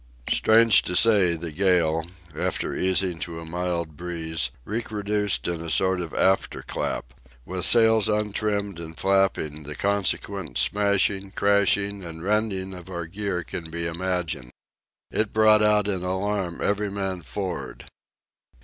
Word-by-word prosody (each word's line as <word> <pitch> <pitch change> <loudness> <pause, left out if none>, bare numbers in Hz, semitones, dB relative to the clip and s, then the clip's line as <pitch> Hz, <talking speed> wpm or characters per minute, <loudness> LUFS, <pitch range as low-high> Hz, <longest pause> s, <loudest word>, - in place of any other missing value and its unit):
Strange 110 -1 +5
to 90 - -3
say, 100 -5 +5
the 85 0 -6
gale, 80 -2 +2 0.3
after - - -2
easing 95 -2 +1
to 85 -1 -5
a 80 - -8
mild 85 -2 -3
breeze, 80 -4 -2 0.2
recrudesced 105 -2 -1
in 85 -1 -2
a 85 - -5
sort 95 +5 +2
of 85 -3 -6
after 95 0 +1
clap. - - -4 0.3
With 90 0 0
sails 110 -3 +5
untrimmed 105 -2 -1
and 80 -1 -8
flapping, 95 -6 +1
the 75 0 -7
consequent 100 -2 -1
smashing, 100 -1 +1
crashing, 100 0 +2
and 80 -1 -8
rending 100 -2 -1
of 90 0 -10
our 85 -2 -4
gear 95 0 -3
can 80 +1 -7
be 85 +1 -3
imagined. 85 -5 -2 0.6
It 110 -1 -1
brought 110 -1 +5
out 105 -1 +3
in 95 -3 -1
alarm 95 -1 -2
every 105 0 0
man 95 -2 -3
for'ard. 95 +1 -5
95 Hz, 140 wpm, -24 LUFS, 85-100 Hz, 0.6 s, Strange